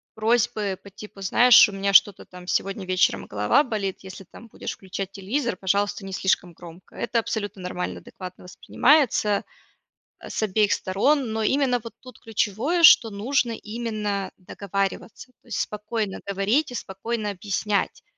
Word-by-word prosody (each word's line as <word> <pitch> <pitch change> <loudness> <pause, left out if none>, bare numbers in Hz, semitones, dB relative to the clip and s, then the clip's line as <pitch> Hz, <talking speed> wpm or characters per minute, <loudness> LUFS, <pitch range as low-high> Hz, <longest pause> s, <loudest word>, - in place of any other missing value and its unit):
просьбы 215 -3 0
по 200 - -13
типу: 205 0 -12
"Знаешь, 240 +5 +7
у 205 - -8
меня 195 0 -1
что-то 200 0 +5
там 180 -1 -13
сегодня 195 +1 -2
вечером 185 0 +1
голова 105 - +2
болит, 200 -5 -3
если 190 0 -10
там 215 +5 -15
будешь - - -6
включать 190 0 -6
телевизор, 210 +2 -2
пожалуйста, 200 +1 -1
не 190 - -7
слишком 180 -2 0
громко." 175 +1 -14
Это 235 -1 -1
абсолютно 205 -3 -4
нормально, 180 0 -4
адекватно 185 -1 -11
воспринимается, 220 - +2 0.8
а, - - -10
с - - -2
обеих 210 0 +2
сторон. 225 +7 +1
Но 220 - -2
именно 255 +2 +2
вот 230 - -10
тут 255 -1 -14
ключевое, 225 - -1
что 230 -7 +8
нужно 235 +4 0
именно 215 -3 -4
договариваться. 195 +6 -4
То - - -27
есть 235 - -2
спокойно 210 -1 -4
говорить 200 +10 +1
и - - -6
спокойно 210 +1 -4
объяснять. 200 +1 -2
205 Hz, 150 wpm, -24 LUFS, 190-230 Hz, 0.8 s, что